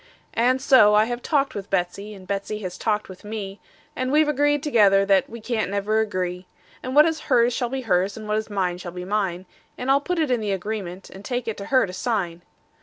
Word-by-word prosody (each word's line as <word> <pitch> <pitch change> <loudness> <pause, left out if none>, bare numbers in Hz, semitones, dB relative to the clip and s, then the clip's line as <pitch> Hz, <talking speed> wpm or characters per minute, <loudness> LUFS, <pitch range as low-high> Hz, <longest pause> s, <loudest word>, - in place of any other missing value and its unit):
And 250 +3 +2
so 255 -6 +6
I 215 +1 +5
have 240 +1 -4
talked 280 -1 0
with 200 -1 -6
Betsey, 195 +3 -2
and 190 -1 -13
Betsey 200 +2 -3
has 180 -1 -5
talked 210 -1 -1
with 185 -1 -12
me, 205 -2 -6 0.4
And 255 0 -2
we 295 - +3
have 310 - +2
agreed 290 0 +1
together 205 -9 +4
that 195 -1 +3
we 235 - -8
can't 220 -2 -2
never 205 +2 0
agree; 185 -4 -2 0.3
And 255 +1 -5
what 300 +1 +8
is 320 -1 0
hers 240 -2 +4
shall 245 0 -1
be 265 +1 -3
hers, 195 -3 0
and 215 -1 -8
what 210 0 0
is 220 - -3
mine 185 -3 -1
shall 175 -1 -7
be 180 0 -6
mine; 190 -3 -1 0.3
And 255 +2 -1
I'll 280 +1 +4
put 360 +4 -2
it 310 -5 +1
in 245 - +2
the 205 -2 -1
agreement, 195 -2 -5
and 195 - -11
take 245 +2 -3
it 225 - -2
to 200 - -6
her 260 -1 +3
to 180 - -8
sign. 185 -6 -2
215 Hz, 240 wpm, -23 LUFS, 195-250 Hz, 0.4 s, what